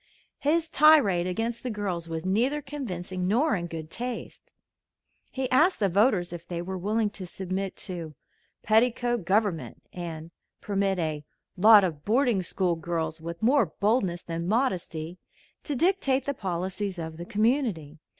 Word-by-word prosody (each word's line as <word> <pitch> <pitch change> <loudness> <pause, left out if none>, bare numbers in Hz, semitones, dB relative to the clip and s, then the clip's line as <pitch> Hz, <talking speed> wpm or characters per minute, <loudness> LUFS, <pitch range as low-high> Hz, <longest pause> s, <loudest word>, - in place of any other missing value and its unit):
His 320 +3 +1
tirade 290 - +5
against 225 +5 -2
the 255 - -4
girls 190 -6 -3
was 165 +1 -4
neither 240 +10 +1
convincing 190 -11 -5
nor 250 +10 +2
in 175 -3 -3
good 160 -1 -7
taste. 245 0 -6 0.8
He 265 -1 -2
asked 315 +9 +4
the 200 -3 +2
voters 190 -2 +2
if 175 0 -8
they 175 -1 -4
were 185 +2 -4
willing 210 +3 0
to 190 -3 -8
submit 190 +1 -4
to 170 -5 -6 0.5
"petticoat 240 -1 +2
government," 195 -3 0
and 165 -2 -6 0.3
permit 195 -1 0
a 155 -3 -2 0.3
"lot 210 +2 +8
of 155 -5 -2
boarding 235 -2 +2
school 180 0 0
girls, 160 -1 -3
with 170 +4 -7
more 250 -2 +4
boldness 190 0 0
than 170 0 -4
modesty" 180 -7 -1 0.5
to 295 - -2
dictate 275 -5 +2
the 280 - -1
policies 190 -1 -3
of 160 -1 -6
the 170 - -6
community. 210 - 0
195 Hz, 150 wpm, -27 LUFS, 170-240 Hz, 0.8 s, lot